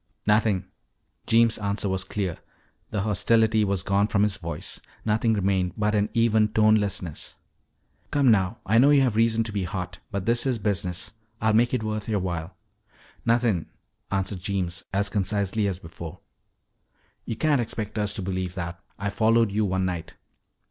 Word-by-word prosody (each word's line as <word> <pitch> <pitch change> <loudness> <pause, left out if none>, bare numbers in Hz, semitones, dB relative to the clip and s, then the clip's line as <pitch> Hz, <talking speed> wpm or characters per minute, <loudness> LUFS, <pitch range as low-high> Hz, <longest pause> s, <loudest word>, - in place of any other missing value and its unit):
"Nothin'." 105 -3 +2 0.6
Jeems' 115 0 +4
answer 100 0 -1
was 95 0 -1
clear. 95 -3 -3 0.5
The 105 - -1
hostility 110 +2 +3
was 100 -2 0
gone 100 +1 +2
from 100 -1 +2
his 105 -2 +1
voice; 85 -4 -6 0.2
nothing 110 +1 +2
remained 95 -3 +1
but 105 0 +1
an 105 0 +1
even 110 -2 +4
tonelessness. 105 -6 +1 0.7
"Come 140 -4 +4
now, 100 0 +2
I 110 +4 +4
know 135 +4 +6
you 145 -1 +6
have 125 -5 +2
reason 115 0 +3
to 110 - -5
be 100 -2 -2
hot. 90 0 -5
But 100 -2 -3
this 120 +3 +2
is 125 -3 +1
business. 95 -4 -2 0.3
I'll 110 0 +2
make 120 +2 +4
it 125 -4 -1
worth 110 0 -3
your 105 -2 +1
while 90 -1 -4 0.4
" - - -28
"Nothin'," 115 -8 +2 0.4
answered 95 0 -1
Jeems 90 -2 -2
as 100 +1 +1
concisely 100 0 0
as 95 -3 -2
before. 80 -2 -9 1.0
"You 115 - -3
can't 145 +1 +2
expect 110 -1 -4
us 105 -1 +1
to 100 - -3
believe 95 -1 -3
that. 85 -2 -5 0.2
I 100 +1 -2
followed 115 0 +3
you 105 +1 +1
one 95 -1 0
night." 85 -3 -4
105 Hz, 170 wpm, -25 LUFS, 95-110 Hz, 1.0 s, know